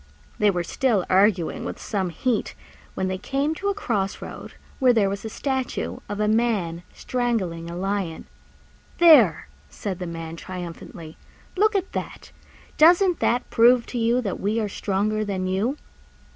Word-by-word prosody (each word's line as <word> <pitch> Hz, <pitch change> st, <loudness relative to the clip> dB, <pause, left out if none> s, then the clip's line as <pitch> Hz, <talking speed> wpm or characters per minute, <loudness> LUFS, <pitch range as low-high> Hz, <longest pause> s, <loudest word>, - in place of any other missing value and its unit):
They 210 Hz, -, +4 dB
were 180 Hz, -3 st, 0 dB
still 215 Hz, -1 st, 0 dB
arguing 190 Hz, -2 st, +2 dB
with -, -, -5 dB
some 195 Hz, -4 st, -2 dB
heat 225 Hz, +7 st, -1 dB, 0.4 s
when 190 Hz, -, -1 dB
they 185 Hz, 0 st, -3 dB
came 275 Hz, +8 st, -1 dB
to 390 Hz, +5 st, -4 dB
a 400 Hz, -, -1 dB
cross 210 Hz, -, -2 dB
road -, -, -9 dB, 0.3 s
where 255 Hz, -3 st, +5 dB
there 200 Hz, -4 st, +2 dB
was 200 Hz, 0 st, -5 dB
a 220 Hz, -, -4 dB
statue 265 Hz, +2 st, -3 dB
of 205 Hz, 0 st, -4 dB
a 210 Hz, -, +1 dB
Man 210 Hz, -7 st, 0 dB
strangling 200 Hz, -10 st, -2 dB
a 170 Hz, -, -6 dB
Lion. 190 Hz, -2 st, -3 dB, 0.7 s
"There!" 290 Hz, -, +6 dB, 0.2 s
said 190 Hz, -, -5 dB
the 180 Hz, -, -4 dB
Man 165 Hz, -1 st, -6 dB
triumphantly, 170 Hz, -3 st, -8 dB, 0.4 s
"look 425 Hz, +3 st, +3 dB
at 385 Hz, -1 st, -1 dB
that! -, -, -6 dB, 0.5 s
Doesn't 350 Hz, +2 st, +5 dB
that 245 Hz, +1 st, +1 dB
prove 240 Hz, +1 st, +5 dB
to 245 Hz, -, -1 dB
you 235 Hz, +2 st, +2 dB
that 200 Hz, -6 st, -3 dB
we 210 Hz, +3 st, 0 dB
are 215 Hz, -, -1 dB
stronger 210 Hz, +2 st, -1 dB
than 195 Hz, -3 st, -3 dB
you?" 200 Hz, +10 st, -1 dB
210 Hz, 160 wpm, -24 LUFS, 185-250 Hz, 0.7 s, There